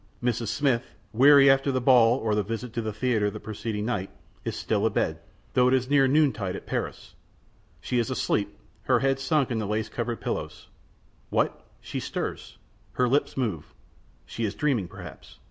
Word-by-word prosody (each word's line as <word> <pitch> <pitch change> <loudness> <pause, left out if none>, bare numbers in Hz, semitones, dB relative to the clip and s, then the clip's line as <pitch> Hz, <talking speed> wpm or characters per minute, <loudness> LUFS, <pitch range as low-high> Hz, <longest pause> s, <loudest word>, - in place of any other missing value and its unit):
Mrs. 120 -2 0
Smith, 130 +1 0 0.2
weary 140 +4 +7
after 135 +1 +4
the 130 - 0
ball 120 -2 +5
or 110 -5 -1
the 105 - +2
visit 115 +3 -5
to 115 - -2
the 110 -1 -3
theater 110 -1 0
the - - -8
preceding 110 0 -4
night, 105 -5 -2 0.3
is - - -3
still - - 0
abed, - - -1 0.3
though 125 0 +4
it 130 - +4
is 130 +1 -1
near 135 -2 +5
noontide 130 -10 +1
at - - -8
Paris. - - -4 0.7
She 125 - -1
is 120 - -1
asleep, 105 -5 -1 0.3
her 125 -3 +3
head 135 0 +1
sunk 140 -1 +1
in 115 - 0
the 105 - -2
lace 110 +1 -2
covered 120 -1 -3
pillows. - - -5 0.6
What? - - -1
She - - -5
stirs? - - -5 0.4
Her 125 - +2
lips 140 +3 0
move. 105 - -3 0.5
She 115 - -5
is 105 -2 -2
dreaming 130 -11 0
perhaps? 90 -5 -12
120 Hz, 180 wpm, -26 LUFS, 110-130 Hz, 0.7 s, weary